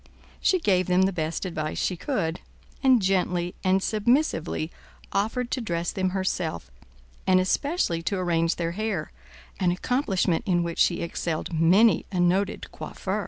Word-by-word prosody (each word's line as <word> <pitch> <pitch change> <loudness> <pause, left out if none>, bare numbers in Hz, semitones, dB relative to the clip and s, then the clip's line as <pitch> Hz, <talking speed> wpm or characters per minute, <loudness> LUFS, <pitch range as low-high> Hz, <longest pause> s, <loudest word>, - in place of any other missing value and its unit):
She 370 - +2
gave 185 - +2
them 180 +1 +3
the 195 +1 +1
best 160 +1 -2
advice 155 -4 -3
she 185 - 0
could, 170 - -2 0.4
and 255 -5 +4
gently 180 -2 +1
and 190 +1 +2
submissively 215 - +1 0.4
offered 230 +5 -1
to 255 - -1
dress 170 -5 -2
them 185 -2 0
herself, 185 - -2 0.6
and 185 0 +5
especially 185 - 0
to 195 +4 -1
arrange 165 -2 +1
their 170 -1 -2
hair, 200 -4 -3 0.5
an 185 -3 +2
accomplishment 190 - 0
in 175 -2 +2
which 170 -1 -4
she 170 - +3
excelled 170 0 -3
many 180 +8 +4
a 185 - -1
noted 185 +3 +1
coiffeur. 195 +2 -4
185 Hz, 150 wpm, -26 LUFS, 170-205 Hz, 0.6 s, and